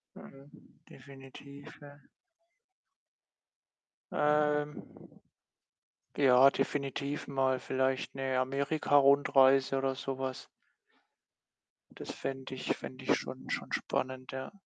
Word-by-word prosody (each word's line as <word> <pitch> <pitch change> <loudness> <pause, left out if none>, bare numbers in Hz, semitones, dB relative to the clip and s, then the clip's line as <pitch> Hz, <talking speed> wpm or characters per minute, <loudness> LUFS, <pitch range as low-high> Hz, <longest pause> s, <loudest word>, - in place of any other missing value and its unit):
Mhm, 135 +1 -14 0.4
definitiv, 140 +1 -13
ja. 145 0 -14 2.1
Ähm. 150 0 +1 1.3
Ja, 135 -1 +6
definitiv 140 +1 -3
mal 130 -1 +1
vielleicht 130 0 -1
'ne 135 -1 -1
Amerikarundreise 135 -1 +3
oder 135 0 -1
so 135 -1 -5
was. 130 -1 -5 1.5
Das - - -9
fände 130 -1 -6
ich - - -2
fände 130 0 -9
ich - - +3
schon 130 0 -7
schon - - -4
spannend, 130 0 -3
ja. 130 0 -6
135 Hz, 90 wpm, -31 LUFS, 130-140 Hz, 2.1 s, Ja